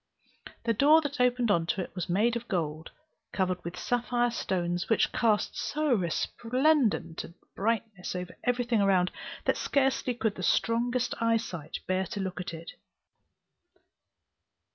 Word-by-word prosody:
The 230 0 +2
door 290 +8 +6
that 285 -4 -3
opened 245 -2 +3
into 170 +1 +1
it 185 - -4
was 180 -3 -4
made 220 +7 +2
of 235 0 -4
gold, 160 -4 -2 0.4
covered 185 -2 -1
with 170 +1 -6
sapphire 245 0 0
stones, 175 -5 -2
which 225 - +3
cast 220 -3 +1
so 305 -2 0
resplendent 235 - +1
a 170 - -12 0.2
brightness 210 -3 -2
over 180 0 -5
everything 245 -3 +1
around, 185 -2 +3 0.3
that - - +2
scarcely 265 -2 +1
could 220 -3 0
the 185 - -8
strongest 240 +6 +1
eyesight 225 -9 -1
bear 185 0 0
to 205 - -5
look 190 -2 -3
at 180 - -5
it. 165 0 -8
220 Hz, 140 wpm, -29 LUFS, 180-245 Hz, 0.4 s, door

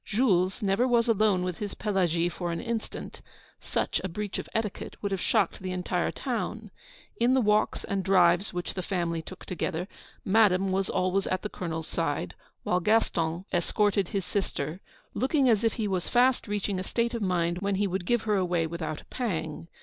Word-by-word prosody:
Jules 200 -3 +2
never 200 +6 +2
was 240 -1 +3
alone 210 -4 +3
with 180 -2 -3
his 205 -2 -4
Pelagie 175 -5 +1
for 175 0 -3
an 170 - -2
instant; 230 -2 -5 0.4
such - - -1
a 190 - -2
breach 205 +3 -4
of - - -7
etiquette 220 -2 -3
would 200 - -1
have 190 -2 -1
shocked 210 -6 +1
the 185 0 -3
entire 180 -1 -1
town. 225 -4 -3 0.5
In 245 +3 +3
the - - +4
walks 210 -2 +2
and 195 -1 -2
drives 180 0 +4
which 175 -1 -4
the 185 - -3
family 170 -3 -1
took 185 +3 -11
together, 175 0 -3 0.4
Madame 195 -2 +4
was 190 0 0
always 185 +1 +1
at 185 - -1
the 210 - -3
Colonel's 165 -4 -4
side; 145 - -2 0.3
while 180 - +2
Gaston 175 -4 +1
escorted 200 +2 +2
his 195 -1 -2
sister, 180 -3 -2 0.3
looking 265 +4 +2
as 225 -2 +4
if 225 - +2
he 220 -3 -2
was 185 -3 -1
fast 250 0 +3
reaching 205 -2 -1
a - - -3
state 235 +4 -1
of 235 - -2
mind 175 -2 +1
when 200 0 0
he 205 +2 +1
would 185 -2 -2
give 240 -2 +2
her 210 -2 +2
away 175 -3 +1
without 160 -2 -4
a - - -22
pang. 165 -10 -3
190 Hz, 190 wpm, -28 LUFS, 175-215 Hz, 0.5 s, the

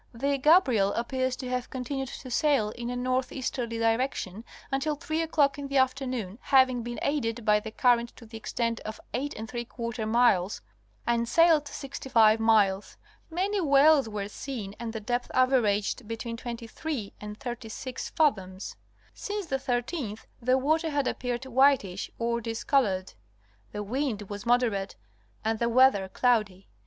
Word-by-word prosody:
The 275 +3 0
Gabriel 260 - +4
appears 260 +2 -1
to 255 -1 -6
have 250 -1 -2
continued 265 +1 -4
to 255 - -9
sail 270 -6 +2
in 240 +2 -6
a 245 - -3
northeasterly 255 -1 -2
direction 225 -3 -1 0.3
until 295 +3 0
three 315 +2 -2
o'clock 290 -3 +2
in 280 - -4
the 275 0 0
afternoon, 255 -6 0
hav 260 -1 +5
ing 245 -1 -3
been 240 +1 -5
aided 240 -6 -1
by 210 0 +5
the 220 +1 -7
current 235 +1 +2
to 235 - -13
the 225 +1 -12
extent 230 +1 -2
of 215 - -7
82 235 -2 -4
miles 220 -5 +3 0.4
and 235 0 +1
sailed 325 -3 +5
65 235 -6 +2
miles; 210 -3 +2 0.3
many 385 +4 0
whales 285 -3 +5
were 205 -2 -4
seen 210 -3 -6
and 235 -1 -4
the 220 - -4
depth 245 +3 -2
averaged 240 -3 +2
between 230 +1 -4
23 235 +1 -5
and 210 0 -7
36 245 0 -6
fathoms. 195 - 0 0.4
Since 410 -1 -4
the 270 -4 -1
13th 245 -2 -3 0.2
the 255 +2 +3
water 315 +5 +1
had 285 -3 0
appeared 245 0 -3
whitish 260 -7 +2
or 235 0 -1
discolored. 225 -4 0 0.6
The 210 - -4
wind 235 -1 -2
was 205 +2 -6
moderate 235 -5 +1 0.5
and 220 0 0
the 235 - +1
weather 235 -6 +4
cloudy. 210 -5 +1
245 Hz, 145 wpm, -28 LUFS, 220-270 Hz, 0.6 s, hav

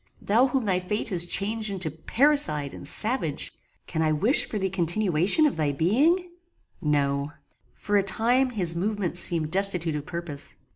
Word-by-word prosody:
Thou 235 +6 +2
whom 260 -2 -2
thy 185 -3 +1
fate 210 +5 -3
has 175 -3 +2
changed 215 +4 0
into 185 -5 -2
paricide 160 - +1
and 140 - -9
savage! 210 - 0 0.3
Can 160 - -3
I 155 -1 +1
wish 210 - +3
for 215 - -3
the 190 -1 -1
continuance 180 - 0
of 305 -3 +3
thy 150 -2 0
being? 290 - +1 0.5
No. 140 -1 -1 0.4
For 205 0 -1
a - - +4
time 240 +7 +1
his 185 -8 +1
movements 185 0 -2
seemed 160 -4 0
destitute 180 -4 +1
of 150 -1 -6
purpose. 170 -5 -4
185 Hz, 160 wpm, -25 LUFS, 160-220 Hz, 0.5 s, a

